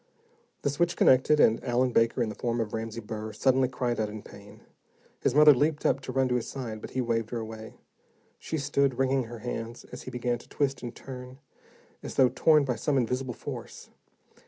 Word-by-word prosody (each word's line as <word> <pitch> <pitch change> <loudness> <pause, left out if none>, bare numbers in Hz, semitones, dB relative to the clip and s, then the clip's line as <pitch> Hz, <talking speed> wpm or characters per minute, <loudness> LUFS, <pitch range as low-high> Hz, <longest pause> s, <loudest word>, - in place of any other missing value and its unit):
The 140 - +1
switch 170 +4 0
connected, 135 +4 +5
and 115 -4 +4
Allen 125 0 +1
Baker, 115 +1 +2
in 110 - -2
the - - -5
form 120 +2 -2
of 110 -2 -2
Ramsey 115 0 -4
Burr, 110 0 -6
suddenly 130 -1 +3
cried 125 -2 -2
out 110 -1 0
in 105 0 -8
pain. 100 0 -14 0.6
His 125 - 0
mother 150 0 +9
leaped 150 +3 0
up 135 - +2
to 130 - -6
run 130 0 +2
to - - +1
his 120 - -4
side, 115 -5 -6
but - - -7
he 130 - -2
waved 115 -2 -1
her 120 - -3
away. 110 0 -7 0.6
She 160 - -4
stood, 140 -2 +1
wringing 135 -1 +1
her 120 +1 -8
hands, 115 -1 -5
as - - -8
he - - -8
began 120 -1 -2
to - - -17
twist 140 -2 -1
and 120 -1 -6
turn, 125 -1 -9 0.6
as - - -7
though 130 -2 +5
torn 155 0 +4
by 125 -4 -1
some 140 +5 0
invisible 125 0 -1
force. - - -8
125 Hz, 205 wpm, -28 LUFS, 115-135 Hz, 0.6 s, mother